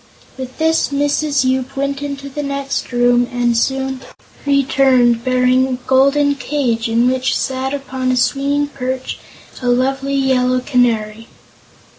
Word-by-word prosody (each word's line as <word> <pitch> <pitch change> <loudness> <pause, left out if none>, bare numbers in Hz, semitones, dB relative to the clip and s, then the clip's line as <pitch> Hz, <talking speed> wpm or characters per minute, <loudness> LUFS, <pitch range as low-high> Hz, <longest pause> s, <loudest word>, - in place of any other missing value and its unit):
With 260 -1 -8
this, 320 0 +2
Mrs. 285 0 0
Yoop 260 +1 -1
went 275 0 -2
into 280 -1 -5
the 280 +2 -5
next 275 -1 -3
room 245 0 +3
and 240 -1 0
soon 265 +2 -1 0.5
returned 265 -4 +3
bearing 255 +1 +2
a 260 - -3
golden 275 +3 +2
cage 255 -6 -2
in 230 +2 +2
which 255 0 0
sat 265 0 -2
upon 265 -2 -3
a 255 - 0
swinging 280 +3 +1
perch 260 -2 -5 0.4
a 250 - -1
lovely 270 +3 0
yellow 255 -2 +2
Canary. 230 -4 0
260 Hz, 135 wpm, -17 LUFS, 250-275 Hz, 0.5 s, room